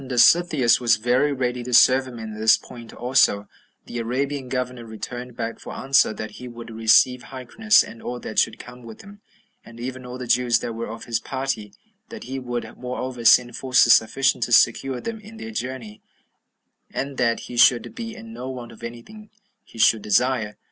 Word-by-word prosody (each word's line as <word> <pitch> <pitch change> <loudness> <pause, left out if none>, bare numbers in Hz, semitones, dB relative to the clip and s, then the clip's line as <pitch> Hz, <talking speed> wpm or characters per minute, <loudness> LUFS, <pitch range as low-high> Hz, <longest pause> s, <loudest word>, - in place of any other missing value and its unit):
And - - -10
when 125 - -3
Dositheus 155 -5 +5
was 120 -2 +3
very 125 +6 +1
ready 125 -2 -2
to 120 0 -1
serve 130 +2 +5
him 125 -2 -9
in 110 -1 -7
this 110 +1 +4
point 115 -2 -12
also, 120 -5 +2 0.4
the 120 - -6
Arabian 130 +3 -3
governor 125 -1 -3
returned 120 +2 -8
back 115 0 -4
for - - -9
answer, 135 -3 +2
that 110 0 -7
he 125 - -7
would 115 -1 -10
receive 115 +3 +3
Hyrcanus, 135 - +2
and 115 - -12
all 125 0 -5
that 110 - -2
should 110 - +1
come 125 +1 -12
with 115 -2 -11
him, 205 +1 -15 0.4
and 115 0 -14
even 130 +1 -6
all 125 0 -8
the 125 - -6
Jews 120 0 +2
that 115 - -4
were 115 +1 -5
of 115 - -8
his 115 -1 -1
party; 130 -7 -4 0.3
that 230 -2 -9
he 135 +1 -5
would, 120 -2 -6
moreover, 125 -1 -5
send 120 +1 +5
forces 125 -3 +4
sufficient 120 +2 +2
to 120 - -9
secure 125 +2 +3
them 230 -1 -5
in 215 +2 -13
their 220 0 -7
journey; 125 - -6 0.9
and 135 0 -4
that 115 -2 +1
he 125 - -9
should 120 0 +4
be 230 -1 -7
in 225 0 -11
no 130 - -6
want 125 -2 -8
of 115 - -16
any 115 0 -8
thing 215 0 -14 0.3
he - - -17
should 110 0 +4
desire. 105 0 0
125 Hz, 200 wpm, -23 LUFS, 115-130 Hz, 0.9 s, Dositheus